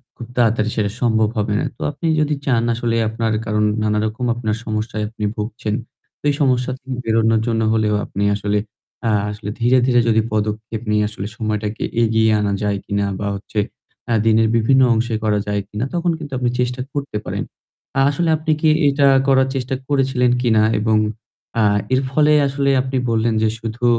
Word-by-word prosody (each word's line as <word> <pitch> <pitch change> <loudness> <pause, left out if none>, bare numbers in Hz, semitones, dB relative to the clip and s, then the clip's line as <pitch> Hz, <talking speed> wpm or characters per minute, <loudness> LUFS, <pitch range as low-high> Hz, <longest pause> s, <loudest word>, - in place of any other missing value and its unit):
খুব 120 - -9
তাড়াতাড়ি 115 -2 +2
সেটা 100 -2 0
সম্ভব 110 -3 +2
হবে 105 0 0
না। - - -1
তো - - -13
আপনি 150 +3 -7
যদি 150 0 +1
চান 120 -4 +2
আসলে 115 0 -1
আপনার, 110 0 -1
কারণ 105 0 0 0.2
নানারকম 110 +3 -1
আপনার 110 -3 -2
সমস্যায় 110 0 -2
আপনি 110 -1 -8
ভুগছেন। 105 0 -3 0.5
তো - - -77
এই 145 - +1
সমস্যা 130 -2 +2
থেকে 130 0 -7
বেরোনোর 115 -1 +2
জন্য 115 -1 +1
হলেও 110 -1 +1
আপনি 100 - -3
আসলে 105 0 -1 0.5
আ - - +2 0.2
আসলে 105 0 -6
ধীরে, 120 +2 +4
ধীরে 120 -1 +4
যদি 110 -1 +4
পদক্ষেপ 110 +1 -2
নিয়ে 105 0 +2
আসলে 105 -1 -6
সময়টাকে 110 -2 -2 0.2
এগিয়ে 110 -1 +3
আনা 100 -1 0
যায় 105 -1 0
কিনা 100 0 -1
বা 100 - -2
হচ্ছে 100 +2 -4 0.5
আ - - +3
দিনের 110 0 +4
বিভিন্ন 130 +4 +4
অংশে 115 0 0
করা 105 -1 +2
যায় 105 0 0
কিনা, 110 +4 -3
তখন 175 0 +1
কিন্তু 145 -3 -8
আপনি 125 -1 +1
চেষ্টা 125 +1 -1
করতে 140 -6 -3
পারেন। - - -3 0.5
আ - - +3
আসলে 165 +3 0
আপনি 155 +1 -1
কি 160 - +3 0.2
এটা 140 0 +2 0.2
করার 130 -1 +4
চেষ্টা 130 0 -2
করেছিলেন 135 -3 +2
কিনা 110 -3 +3 0.2
এবং 110 0 +2 0.6
আ 110 - +4 0.3
এর 130 - +3
ফলে 150 +1 +4
আসলে 140 0 0
আপনি 130 0 -3
বললেন 115 0 +1
যে 110 - +3
শুধু 115 +2 -4
115 Hz, 185 wpm, -19 LUFS, 105-130 Hz, 0.6 s, ধীরে